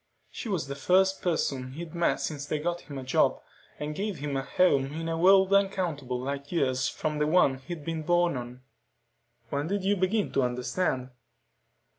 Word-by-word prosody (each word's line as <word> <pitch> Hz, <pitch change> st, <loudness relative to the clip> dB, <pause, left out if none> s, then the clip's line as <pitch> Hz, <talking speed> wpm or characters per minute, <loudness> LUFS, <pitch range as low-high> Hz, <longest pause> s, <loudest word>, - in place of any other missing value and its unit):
She 235 Hz, -, -6 dB
was 185 Hz, -8 st, -1 dB
the 140 Hz, -, -5 dB
first 190 Hz, +7 st, +2 dB
person 135 Hz, -7 st, -1 dB
he'd 160 Hz, +2 st, -7 dB
met 170 Hz, 0 st, +1 dB
since 145 Hz, -2 st, -4 dB
they 155 Hz, -, -1 dB
got 175 Hz, +3 st, -2 dB
him 140 Hz, -3 st, -9 dB
a 135 Hz, -, -5 dB
job 130 Hz, -, +2 dB, 0.4 s
and 150 Hz, +1 st, -4 dB
gave 200 Hz, +2 st, -3 dB
him 145 Hz, -1 st, -3 dB
a 135 Hz, -, 0 dB
home 140 Hz, -2 st, +2 dB
in 165 Hz, +1 st, -4 dB
a 165 Hz, -, -1 dB
world 190 Hz, +3 st, +5 dB
uncountable 175 Hz, -10 st, +1 dB
light 140 Hz, +2 st, -4 dB
years 130 Hz, -6 st, +1 dB
from 150 Hz, -1 st, -3 dB
the 150 Hz, -, +2 dB
one 150 Hz, -5 st, +3 dB
he'd 155 Hz, +1 st, -8 dB
been 165 Hz, -1 st, -2 dB
born 175 Hz, 0 st, +2 dB
on. 125 Hz, 0 st, -7 dB, 0.9 s
"When 140 Hz, +2 st, -1 dB
did 200 Hz, +1 st, -1 dB
you 200 Hz, +1 st, +2 dB
begin 200 Hz, +3 st, 0 dB
to -, -, +2 dB
understand?" 125 Hz, +2 st, -1 dB
155 Hz, 185 wpm, -28 LUFS, 135-180 Hz, 0.9 s, world